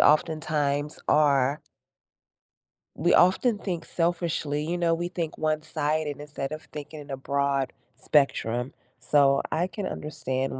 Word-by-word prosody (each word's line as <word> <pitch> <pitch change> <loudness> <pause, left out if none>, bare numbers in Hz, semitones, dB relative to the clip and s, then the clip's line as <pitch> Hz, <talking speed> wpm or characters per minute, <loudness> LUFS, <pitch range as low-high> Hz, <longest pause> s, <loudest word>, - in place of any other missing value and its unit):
oftentimes 150 -1 +2
are 145 -1 +3 1.4
we - - +2
often 205 +5 +4
think 175 -5 -4
selfishly, 165 -4 -1
you 175 +1 -1
know, 170 -1 +2
we 175 +1 -1
think 170 -3 -4
one-sided 155 -1 -1
instead 145 -2 -5
of 155 0 -6
thinking 150 +1 -7
in 145 0 -11
a 135 - -3
broad 140 0 0 0.2
spectrum. 125 -3 +1 0.3
So, 140 -2 +4
I 170 +3 +1
can 200 0 -5
understand 130 -3 -3
150 Hz, 125 wpm, -27 LUFS, 140-165 Hz, 1.4 s, often